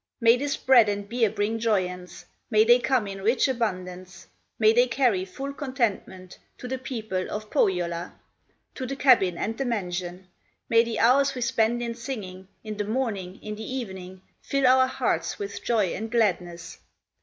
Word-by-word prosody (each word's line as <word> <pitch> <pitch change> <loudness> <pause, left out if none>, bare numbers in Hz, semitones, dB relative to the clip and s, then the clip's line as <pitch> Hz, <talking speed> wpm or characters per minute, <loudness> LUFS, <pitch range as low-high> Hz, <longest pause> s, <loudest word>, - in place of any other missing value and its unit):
May 230 -1 +6
this 280 +3 -2
bread 240 -5 +5
and 205 0 -3
beer 230 0 +1
bring 215 +2 -2
joyance, 180 -5 -2 0.2
May 215 -2 +5
they 240 +2 +6
come 245 -2 +1
in 195 -1 -7
rich 230 +8 +2
abundance, 185 -7 -4 0.3
May 220 0 +5
they 245 +2 +4
carry 235 -7 +1
full 270 +9 -6
contentment 230 - -3 0.2
To 250 - -8
the 260 +1 -3
people 220 -8 -4
of 215 0 -6
Pohyola, 175 -2 0 0.6
To 260 - -5
the 275 - -4
cabin 240 -10 +4
and 220 +5 -2
the 270 - -1
mansion; 180 -5 -4 0.4
May 230 0 +5
the 230 -1 -4
hours 275 +3 +3
we 250 - -5
spend 235 0 +1
in 235 -1 -3
singing, 210 -6 -7 0.2
In 215 -1 -6
the 210 - -1
morning, 205 -6 -3
in 210 - -5
the 220 +5 -6
evening, 190 -6 -7 0.2
Fill 275 -1 0
our 260 +1 +5
hearts - - -1
with 405 -1 -6
joy 215 -7 +1
and 225 +2 -5
gladness! 180 -7 -1
220 Hz, 170 wpm, -25 LUFS, 190-250 Hz, 0.6 s, May